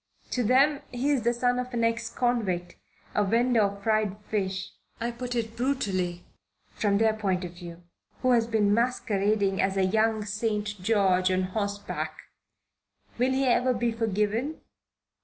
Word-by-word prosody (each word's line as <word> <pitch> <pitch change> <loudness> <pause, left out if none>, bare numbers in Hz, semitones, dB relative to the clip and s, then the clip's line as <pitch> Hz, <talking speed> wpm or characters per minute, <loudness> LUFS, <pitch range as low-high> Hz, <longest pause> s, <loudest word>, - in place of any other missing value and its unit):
To 250 - 0
them 275 +5 +4
he's 265 +2 +1
the 235 +2 +2
son 245 +1 +1
of 250 0 -4
an 230 - 0
ex 230 0 0
convict 200 -9 -1 0.4
a 210 - +2
vendor 230 +3 +3
of 200 0 -1
fried 215 -2 +1
fish 190 -2 -2 0.3
I 235 +1 -2
put 245 +1 -5
it 225 -1 -2
brutally 195 -9 -1 0.5
from 200 -2 +1
their 220 +1 +3
point 190 -4 -1
of 175 - -8
view 175 -1 -10 0.4
who 255 - +4
has 230 -2 +3
been 210 -3 +2
masquerading 210 -4 +1
as 195 0 0
a 190 - +3
young 220 +2 +1
St. 210 0 -1
George 190 -3 +3
on 185 0 +1
horseback. 200 +2 -3 1.0
Will 250 +2 +3
he 265 +1 +1
ever 250 0 +3
be 235 0 0
forgiven? 225 +6 -1
220 Hz, 155 wpm, -27 LUFS, 195-240 Hz, 1.0 s, them